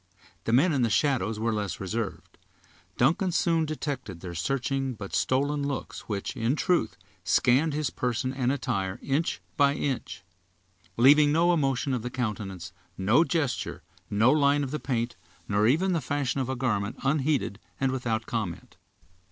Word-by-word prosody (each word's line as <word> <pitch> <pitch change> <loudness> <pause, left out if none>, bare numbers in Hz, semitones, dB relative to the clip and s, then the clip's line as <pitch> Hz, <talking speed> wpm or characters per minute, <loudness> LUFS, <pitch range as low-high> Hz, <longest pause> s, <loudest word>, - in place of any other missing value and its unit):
The - - 0
men 145 +8 +4
in 135 - +1
the 120 - +2
shadow 130 -4 +2
were 115 0 0
less 105 -3 -3
reserved. 100 +2 -5 0.6
Duncan 175 - +2
soon 165 -2 +2
detected 135 - -4
their 85 0 -7
searching, 135 - -1
but 100 -2 -8
stolen, 145 +3 +1
looks 140 -4 -5
which, 100 -2 -3
in 115 +4 0
truth, 180 +2 +1 0.3
scanned 135 - +3
his 150 -3 -1
person 125 +1 -1
and 130 -1 0
attire 110 -9 -2
inch 145 +5 -1 0.2
by 140 -2 +4
inch; 110 - -3 0.7
leaving 145 +4 +6
no 170 +3 +4
emotion 135 -4 0
of 125 - -1
the 125 - -4
countenance, 100 -7 -4 0.2
no 110 - +4
gesture, 155 -7 -2 0.3
no 110 +5 +4
line 145 -1 +3
of 135 - -4
the 150 - -2
paint, 120 -2 -2 0.3
nor 105 +1 +2
even 180 +9 +2
the 165 - 0
fashion 140 -2 -1
of 130 - -3
a 130 - -1
garment, 115 -5 -1
unheeded, 135 -6 0 0.2
and 135 -1 +1
without 115 -4 -2
comment. 105 -8 -4
130 Hz, 160 wpm, -27 LUFS, 110-145 Hz, 0.7 s, leaving